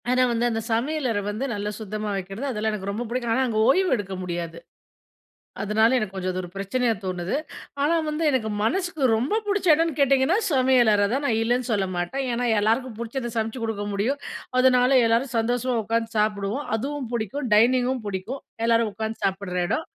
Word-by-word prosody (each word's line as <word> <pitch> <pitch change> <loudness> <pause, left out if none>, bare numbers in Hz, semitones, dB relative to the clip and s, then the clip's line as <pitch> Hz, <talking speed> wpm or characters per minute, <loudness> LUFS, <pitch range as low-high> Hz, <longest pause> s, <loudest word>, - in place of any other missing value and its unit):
ஆனா 255 0 +3
வந்து 235 0 +1
அந்த 225 0 -1
சமையலற 255 -2 0
வந்து 215 +6 -3
நல்லா 205 0 -3
சுத்தமா 215 0 -4
வைக்கிறது 195 +7 -5
அதெல்லாம், 220 -1 -1
எனக்கு 200 -1 -3
ரொம்ப 220 +4 -3
பிடிக்கும். 240 -1 -2
ஆனா 260 +3 +2
அங்க 220 -2 0
ஓய்வு 370 +7 +3
எடுக்க 200 -4 -5
முடியாது. 170 -2 -4 1.0
அதனால 215 +2 +3
எனக்கு 215 -5 -2
கொஞ்சம் 185 -1 -2
ஒரு 180 - -7
பிரச்சனையா 225 +5 0
தோணுது, 185 -1 -2 0.5
ஆனா 305 +4 +3
வந்து 305 +2 -2
எனக்கு 255 -6 0
மனசுக்கு 340 - -1
ரொம்ப 280 - 0
புடிச்ச 400 -2 0
எடம்னு 325 -1 +1
கேட்டிங்கன்னா 275 +5 +4 0.2
சமையலறதான், 250 -2 +3
நான் 225 -4 +1
இல்லன்னு 245 +2 0
சொல்ல 200 -3 +1
மாட்டேன். 175 +11 -2
ஏன்னா 240 +1 -1
எல்லாருக்கும் 225 +2 0
புடிச்சத 235 +1 -4
சமச்சு 225 +2 -2
குடுக்க 220 -2 -2
முடியும், 235 +9 0 0.4
அதனால 255 +1 +5
எல்லாரும் 235 +2 +1
சந்தோசமா 245 +2 0
உக்காந்து 225 +1 -1
சாப்டுவோம். 210 +5 0
அதுவும் 275 +1 -4
புடிக்கும், 235 +4 -2
டைனிங்கும் 250 +2 +3
பிடிக்கும், 205 +8 -4 0.2
எல்லாரும் 230 -1 +2
உட்கார்ந்து 220 +1 -5
சாப்புடுற 190 -1 -2
எடம். 315 - -1
230 Hz, 165 wpm, -24 LUFS, 210-260 Hz, 1.0 s, அதனால